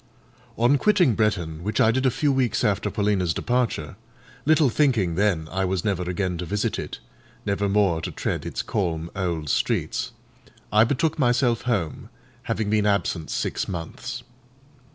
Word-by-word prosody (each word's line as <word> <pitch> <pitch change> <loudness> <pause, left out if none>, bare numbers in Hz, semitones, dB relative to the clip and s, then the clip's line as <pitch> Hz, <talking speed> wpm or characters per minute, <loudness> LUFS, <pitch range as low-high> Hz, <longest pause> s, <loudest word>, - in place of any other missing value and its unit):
On 125 +5 +4
quitting 190 - +4
Bretton, 90 -8 0
which 105 +4 -2
I 110 - +5
did 130 +2 +1
a - - +5
few 135 +4 +1
weeks 125 -4 +1
after 100 -2 +1
Paulina's 100 -5 0
departure—little 120 - -1
thinking 115 - +2
then 90 -4 +1
I 95 +2 0
was 95 -2 -1
never 100 -4 0
again 90 -1 -2
to 90 - -3
visit 105 +3 -1
it; - - -5 0.5
never 100 0 0
more 95 -5 +2
to - - -3
tread - - -3
its - - -4
calm 85 -5 -2
old 85 -5 -2
streets—I 105 +8 -1
betook 150 +6 0
myself 120 -2 +2
home, 90 -10 -2 0.4
having 105 -2 0
been 105 -1 +2
absent 90 -5 0
six - - -2
months. 85 -3 -5
105 Hz, 150 wpm, -24 LUFS, 90-120 Hz, 0.5 s, I